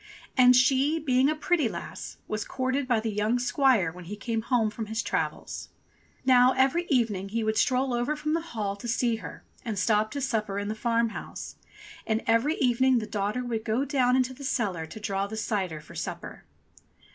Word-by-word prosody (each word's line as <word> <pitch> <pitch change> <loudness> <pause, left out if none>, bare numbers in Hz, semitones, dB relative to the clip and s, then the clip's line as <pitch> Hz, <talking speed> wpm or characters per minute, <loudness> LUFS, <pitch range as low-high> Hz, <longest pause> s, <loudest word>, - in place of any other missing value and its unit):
And 250 -1 +7
she, 270 +5 +4
being 265 -3 +2
a 310 - 0
pretty 305 -4 +1
lass, - - -7
was 215 -1 -2
courted 260 +3 -2
by 240 -3 +2
the 220 0 -2
young 210 +3 +1
squire 245 - +2
when 180 +1 -11
he 205 +5 -6
came 225 +2 -2
home 225 -2 +1
from 220 0 -5
his 220 +1 -2
travels. - - -3 0.6
Now 255 0 +6
every 275 +7 +2
evening 220 - +1
he 225 +2 -1
would 220 0 0
stroll 255 +2 +2
over 240 +5 0
from 305 +1 -2
the 330 - +1
Hall 215 -11 -3
to 240 - -7
see 235 -1 +1
her - - -9 0.2
and 220 -4 -3
stop 215 +2 +2
to 285 - -3
supper 220 -6 -1
in 205 0 -2
the - - -1
farm 230 +1 +1
house, - - -8 0.5
and 220 0 0
every 230 +8 +2
evening 260 0 +3
the 220 - -1
daughter 210 +3 -2
would 225 -2 -2
go 230 +5 0
down 255 -3 +2
into 260 0 +1
the 280 - -11
cellar 195 -11 -1
to 220 - -9
draw 200 -1 -2
the 220 +2 -6
cider 190 -7 -2
for 150 - -14
supper. - - -6
235 Hz, 200 wpm, -27 LUFS, 215-260 Hz, 0.6 s, And